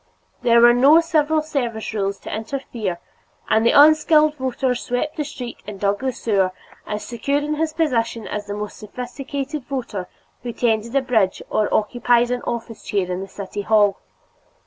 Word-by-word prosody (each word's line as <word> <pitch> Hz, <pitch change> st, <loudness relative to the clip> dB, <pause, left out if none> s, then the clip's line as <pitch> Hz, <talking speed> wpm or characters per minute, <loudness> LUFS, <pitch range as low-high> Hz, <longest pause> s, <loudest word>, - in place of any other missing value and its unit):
There 235 Hz, -1 st, +5 dB
were 240 Hz, 0 st, +8 dB
no 275 Hz, +6 st, +6 dB
civil 315 Hz, -2 st, +1 dB
service 240 Hz, -9 st, -3 dB
rules 200 Hz, -2 st, -1 dB
to -, -, -5 dB
interfere, 220 Hz, -5 st, -4 dB, 0.5 s
and 220 Hz, +1 st, +4 dB
the 235 Hz, -, +5 dB
unskilled 310 Hz, 0 st, +6 dB
voter 260 Hz, -1 st, -1 dB
swept 250 Hz, +5 st, -3 dB
the 300 Hz, -, -1 dB
street 250 Hz, -4 st, -7 dB
and 205 Hz, -2 st, -7 dB
dug 200 Hz, 0 st, +1 dB
the 265 Hz, 0 st, -1 dB
sewer, 195 Hz, -6 st, 0 dB, 0.3 s
as 210 Hz, 0 st, -4 dB
secure 255 Hz, +4 st, -1 dB
in 295 Hz, +1 st, -1 dB
his 315 Hz, +1 st, -1 dB
position 235 Hz, -8 st, -1 dB
as 205 Hz, -1 st, -5 dB
the 205 Hz, -, -4 dB
more 210 Hz, 0 st, -4 dB
sophisticated 265 Hz, +5 st, -6 dB
voter 230 Hz, -9 st, -4 dB, 0.3 s
who 240 Hz, 0 st, -5 dB
tended 230 Hz, +1 st, 0 dB
a 275 Hz, -, +3 dB
bridge 220 Hz, -7 st, +1 dB
or 215 Hz, -, +1 dB
occupied 240 Hz, +2 st, +2 dB
an 250 Hz, -1 st, -1 dB
office 230 Hz, -1 st, -4 dB
chair 190 Hz, -3 st, -1 dB
in 180 Hz, +1 st, -3 dB
the 195 Hz, -, -6 dB
city 200 Hz, +1 st, -6 dB
hall. 205 Hz, -1 st, +3 dB
240 Hz, 170 wpm, -21 LUFS, 210-275 Hz, 0.5 s, were